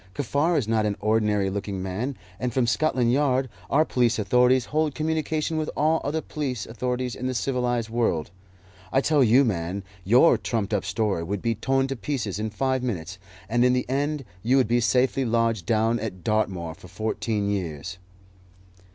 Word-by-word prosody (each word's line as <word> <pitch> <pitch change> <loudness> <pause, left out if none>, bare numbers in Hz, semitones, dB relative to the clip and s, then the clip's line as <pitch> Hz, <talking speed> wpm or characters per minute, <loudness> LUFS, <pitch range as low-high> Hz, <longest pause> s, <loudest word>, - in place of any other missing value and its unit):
Kaffar 145 +5 +1
is 120 - 0
not 110 -1 +2
an 100 - -2
ordinary 105 -3 +1
looking 100 -1 -4
man, 110 +9 -3 0.2
and 125 -1 -1
from 125 +1 +1
Scotland 125 -2 +1
Yard 135 -2 +2 0.2
our 155 +3 +4
police 120 -5 +1
authorities 125 +3 +3
hold 155 -2 +1
communication 155 0 -1
with 155 -1 -1
all 160 +2 +2
other 155 +3 -1
police 130 -9 -4
authorities 125 +1 -3
in 125 - -4
the 130 - -2
civilized 120 -3 0
world. 110 -10 -1 0.6
I 135 - +3
tell 150 -1 +3
you, 125 +4 +5
man, 95 -2 -2 0.2
your 120 - +5
trumped 110 -3 -2
up 100 -2 0
story 95 -1 0
would 95 +4 -4
be 115 - +1
torn 135 +5 +1
to 135 0 -3
pieces 115 -7 -3
in 110 +1 -2
five 130 +4 -1
minutes, 95 -7 -4 0.3
and 120 +3 +2
in 125 0 +4
the 125 0 0
end 140 +2 -1 0.2
you 125 +6 +3
would 130 - +3
be 120 +2 +2
safely 125 +3 +2
lodged 115 -4 0
down 115 +1 +2
at 95 -6 -6
Dartmoor 95 -6 -1
for 90 - -14
fourteen 110 0 -2
years." 90 -2 -4
120 Hz, 175 wpm, -25 LUFS, 105-135 Hz, 0.6 s, you